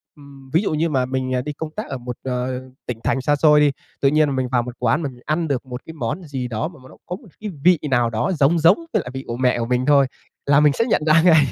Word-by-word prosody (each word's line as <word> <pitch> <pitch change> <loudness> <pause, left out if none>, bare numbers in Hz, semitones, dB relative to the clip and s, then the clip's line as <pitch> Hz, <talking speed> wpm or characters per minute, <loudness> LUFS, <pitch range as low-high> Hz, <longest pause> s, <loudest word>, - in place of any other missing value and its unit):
ừm, 140 -2 -15
ví 165 - +4
dụ 200 - -1
như 160 +2 +1
mà 130 -3 +1
mình, 130 0 -2
ờ, 125 - +1
đi 150 +2 -5
công 155 +2 -6
tác 215 - -4
ở 135 - -4
một, 125 0 -7
ờ, 125 0 -2 0.2
tỉnh 120 -2 -5
thành 135 - 0
xa 145 +2 +2
xôi 150 0 +5
đi, 145 -1 +4 0.3
tự 135 - +4
nhiên 150 -2 +2
mình 130 -1 -1
vào 120 -2 +3
một 125 0 -7
quán 125 +7 +1
mà 145 - -2
mình 125 -1 -15
ăn 160 +2 0
được 135 -2 -2
một 125 0 -7
cái 160 - -9
món 150 +5 -4
gì 135 -5 -4
đó 115 +5 -2
mà 165 -5 -13
mà 130 - -14
nó - - -16
có 180 - -4
một 210 - -15
cái 210 -1 -5
vị 180 -3 +5
nào 120 -2 +3
đó 115 - -1
giống 155 +4 +4
giống 165 +5 +6 0.2
với - - +2
lại 125 - -8
vị 135 +1 -5
của 120 - -4
mẹ 125 -1 +2
của 115 - -1
mình 125 +1 0
thôi 140 -2 +5 0.4
là 140 0 +5
mình 150 -1 +4
sẽ 230 - 0
nhận 220 - +1
ra 160 +1 +5
ngay. 160 -5 +6
140 Hz, 300 wpm, -21 LUFS, 125-155 Hz, 0.4 s, giống